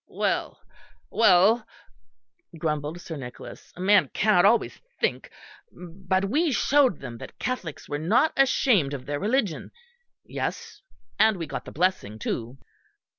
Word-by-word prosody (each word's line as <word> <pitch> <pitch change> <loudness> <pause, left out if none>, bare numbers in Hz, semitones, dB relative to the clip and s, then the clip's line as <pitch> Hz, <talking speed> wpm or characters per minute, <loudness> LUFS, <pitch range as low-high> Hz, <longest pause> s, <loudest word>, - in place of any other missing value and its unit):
"Well, - - -2 0.5
well," 215 +2 +4 0.9
grumbled 150 +1 -3
Sir 165 -2 -7
Nicholas, 125 -3 -10
"a - - -14
man 200 +2 +4
cannot 205 -4 +4
always 225 +3 +2 0.2
think, - - -1 0.4
but 185 +2 -3
we 300 - +1
showed 270 -3 +2
them 115 -1 -8
that - - -11
Catholics 190 - -5
were 145 - -3
not 215 - +2
ashamed 240 - +2
of 130 -2 -9
their 145 0 -3
religion 210 - -1 0.6
yes, 460 -2 -5 0.4
and 220 -1 +4
we 165 - -4
got 145 - -6
the - - -9
blessing 175 - -1
too." 115 +3 -4
185 Hz, 130 wpm, -25 LUFS, 150-230 Hz, 0.9 s, well